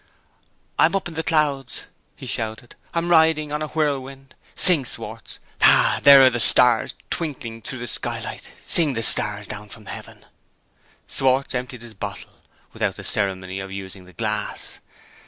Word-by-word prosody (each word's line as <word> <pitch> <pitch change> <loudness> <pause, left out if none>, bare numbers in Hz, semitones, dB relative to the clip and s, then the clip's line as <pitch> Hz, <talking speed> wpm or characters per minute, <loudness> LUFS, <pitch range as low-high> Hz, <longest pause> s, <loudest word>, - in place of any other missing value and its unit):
"I'm - - +4
up 195 - -2
in 170 - -9
the 160 - -3
clouds!" 150 -4 -1 0.3
he - - -11
shouted; 110 +2 -5 0.2
"I'm 170 0 -2
riding 160 -3 +3
on 150 +1 -3
a 155 - -3
whirlwind. 135 -3 -4 0.2
Sing, 175 -7 +6
Schwartz! 125 - -7 0.2
Ha! - - +5
there 140 -1 +8
are 130 - +5
the 120 - -3
stars 120 0 +4 0.2
twinkling 135 -8 -5
through 130 - -5
the 120 - -6
skylight! - - -1
Sing 160 -5 +3
the 115 -1 -2
stars 105 -1 +3
down 105 0 -8
from 110 +1 -14
heaven!" - - -11 0.8
Schwartz 135 0 0
emptied 125 -1 -6
his 115 -2 -12
bottle, 100 - -9 0.3
without - - -2
the - - -10
ceremony 95 -2 -3
of 95 0 -8
using 95 -1 -9
the 90 - -18
glass. 105 -1 -4
130 Hz, 155 wpm, -21 LUFS, 110-150 Hz, 0.8 s, there